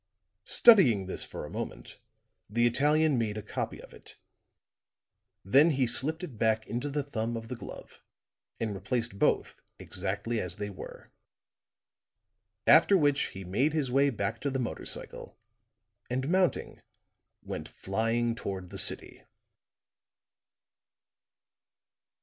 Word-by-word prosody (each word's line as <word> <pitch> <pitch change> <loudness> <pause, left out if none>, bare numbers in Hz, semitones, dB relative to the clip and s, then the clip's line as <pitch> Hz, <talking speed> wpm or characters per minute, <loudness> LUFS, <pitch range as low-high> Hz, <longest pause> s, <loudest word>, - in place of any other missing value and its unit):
Studying 135 - +6
this 95 - 0
for - - -7
a - - -9
moment, - - -7 0.5
the 120 +3 +2
Italian 145 +3 +3
made 110 -2 -2
a 105 - -5
copy - - -4
of - - -13
it. - - -13 1.3
Then 140 +11 +5
he 135 -4 +2
slipped 155 +8 -1
it 130 -12 -8
back 110 -1 +1
into 120 +6 -3
the 145 0 -2
thumb 115 -4 -3
of 115 0 -8
the 125 - -4
glove - - -11 0.6
and 110 -2 -2
replaced 115 +2 -3
both - - +1 0.2
exactly 115 -1 -3
as 90 -1 -4
they 105 +1 -5
were; 95 - -11 1.5
after 200 - +7
which 145 -3 +2
he 95 - -7
made 125 - 0
his 145 -5 -1
way 140 +2 +4
back 100 -6 -3
to 140 - -1
the 135 - -2
motor 125 -3 -4
cycle, - - -7 0.7
and 130 +3 -2
mounting, 185 -1 0 0.6
went - - -6
flying 115 +4 -1
toward 95 -6 -6
the - - -3
city. - - +1
120 Hz, 130 wpm, -29 LUFS, 105-145 Hz, 1.5 s, after